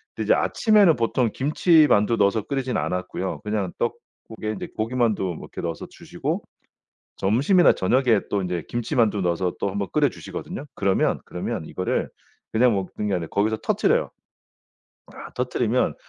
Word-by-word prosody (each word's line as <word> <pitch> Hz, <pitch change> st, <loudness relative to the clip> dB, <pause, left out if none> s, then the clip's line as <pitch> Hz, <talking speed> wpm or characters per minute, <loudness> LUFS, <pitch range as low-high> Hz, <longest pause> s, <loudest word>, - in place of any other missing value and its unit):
근데 -, -, -3 dB
이제 -, -, +5 dB
아침에는 210 Hz, -7 st, +4 dB
보통 115 Hz, 0 st, +1 dB
김치만두 145 Hz, -, +3 dB
넣어서 100 Hz, +1 st, +2 dB
끓이진 130 Hz, 0 st, -2 dB
않았고요. 90 Hz, +1 st, -3 dB
그냥 105 Hz, -4 st, -2 dB
떡국에 110 Hz, -1 st, -5 dB
이제 -, -, -5 dB
고기만두 115 Hz, -2 st, 0 dB
뭐 90 Hz, -4 st, -3 dB
이렇게 -, -, -8 dB
넣어서 85 Hz, -2 st, -4 dB
주시고 -, -, -4 dB, 0.7 s
점심이나 140 Hz, -, +4 dB
저녁에 115 Hz, +1 st, +2 dB
또 100 Hz, -, 0 dB
이제 90 Hz, -3 st, -3 dB
김치만두 115 Hz, -3 st, 0 dB
넣어서 90 Hz, 0 st, 0 dB
또 100 Hz, -, 0 dB
1 100 Hz, -, -5 dB
번 100 Hz, -, -2 dB
끓여 150 Hz, -2 st, +3 dB
주시거든요. 90 Hz, -, -7 dB
그러면, 95 Hz, -1 st, +1 dB
그러면 -, -, -4 dB
이거를 -, -, -2 dB, 0.4 s
그냥 120 Hz, +1 st, +4 dB
먹는 100 Hz, +1 st, -3 dB
게 100 Hz, -, +1 dB
아니라 85 Hz, -2 st, -3 dB
거기서 110 Hz, +2 st, +1 dB
터뜨려요. 390 Hz, -, +1 dB, 1.0 s
아 -, -, -10 dB
터뜨리면 -, -, 0 dB
110 Hz, 375 characters per minute, -24 LUFS, 95-130 Hz, 1.0 s, 이제